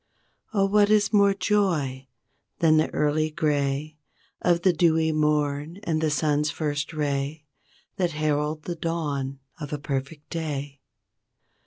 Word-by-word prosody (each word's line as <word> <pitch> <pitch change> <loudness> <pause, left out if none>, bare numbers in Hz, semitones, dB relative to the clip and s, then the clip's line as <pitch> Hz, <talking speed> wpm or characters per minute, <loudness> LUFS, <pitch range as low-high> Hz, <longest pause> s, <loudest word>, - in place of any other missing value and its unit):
Oh 200 -3 +2
what 205 +1 +4
is 210 0 +3
more 200 -1 +5
joy 160 -11 0 0.5
than 155 -2 +4
the 155 - +2
early 155 +1 +1
gray 150 -1 -1 0.4
Of 175 -1 +2
the 185 - +4
dewy 160 -1 +3
morn 150 +1 0
and 160 -5 0
the 160 - +2
sun's 150 0 +1
first 150 0 -2
ray 145 0 -2 0.5
That 175 -3 0
herald 150 0 -1
the 175 - -3
dawn 145 -5 -3 0.2
of 150 -2 -6
a 150 - -1
perfect 140 +2 -5
day? 145 -4 -4
155 Hz, 135 wpm, -25 LUFS, 145-165 Hz, 0.5 s, more